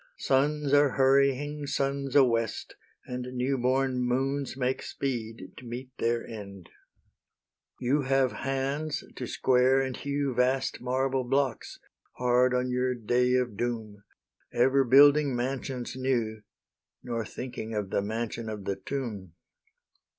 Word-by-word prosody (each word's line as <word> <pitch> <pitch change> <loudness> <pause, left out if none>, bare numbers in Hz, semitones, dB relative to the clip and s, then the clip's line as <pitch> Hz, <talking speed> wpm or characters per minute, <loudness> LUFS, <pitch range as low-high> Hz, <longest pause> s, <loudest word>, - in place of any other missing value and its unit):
Suns 145 +1 +1
are 145 -2 +5
hurrying 140 +2 +2
suns 140 -1 -2
a 140 - +8
west, 115 -3 -1 0.3
And 125 0 -5
newborn 130 0 +1
moons 135 +2 -1
make 130 0 -1
speed 115 -7 -4
to 125 - -11
meet 125 +2 -7
their 115 0 0
end. 100 -5 -9 1.1
You 135 +4 +1
have 135 -1 +2
hands 135 +3 -2
to 125 - -5
square 130 +2 +3
and 130 -2 -2
hew 140 -1 -2
Vast 130 +2 0
marble 130 +1 0
blocks, 135 -1 -1 0.4
hard 125 +1 +3
on 125 0 0
your 125 0 0
day 125 +2 +1
of 125 -4 0
doom, 110 -3 -4 0.5
Ever 130 +3 +3
building 140 +2 +6
mansions 125 0 -3
new, 120 -5 -1 0.6
Nor 115 -2 -3
thinking 115 -1 -6
of 100 -2 -3
the - - +1
mansion 110 +2 -4
of 105 -3 -6
the 100 - -2
tomb. 105 - -5
125 Hz, 130 wpm, -28 LUFS, 120-135 Hz, 1.1 s, a